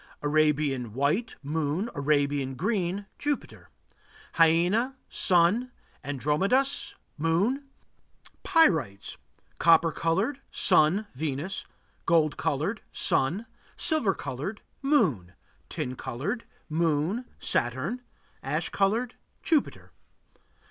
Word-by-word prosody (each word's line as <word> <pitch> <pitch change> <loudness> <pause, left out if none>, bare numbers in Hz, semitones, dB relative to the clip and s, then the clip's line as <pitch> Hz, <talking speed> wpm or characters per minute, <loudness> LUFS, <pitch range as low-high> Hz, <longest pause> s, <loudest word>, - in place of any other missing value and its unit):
Arabian, 145 -5 +1
white 145 - 0
Moon. 155 +6 -1
Arabian, 140 -2 0
green 195 - -1
Jupiter. 290 -1 -4 0.6
Hyena 175 +11 +3
Sun. 185 +8 +3 0.3
Androdamas 155 - 0 0.2
Moon. 195 - +1 0.8
Pyrites: 160 - +2 0.4
Copper 165 0 +5
colored 195 - -1
Sun, 180 +4 +4
Venus. 150 +6 -4 0.4
Gold 160 -3 +3
colored 160 +6 -2
Sun. 170 +12 +2 0.3
Silver 310 - +2
colored 145 - -5 0.2
Moon. 135 - +1 0.3
Tin 125 - -4
colored 135 - -4 0.2
Moon, 165 - 0
Saturn. 130 - -1 0.4
Ash - - -2
colored 225 +5 0 0.3
Jupiter. 315 -4 0
165 Hz, 80 wpm, -27 LUFS, 145-220 Hz, 0.8 s, Copper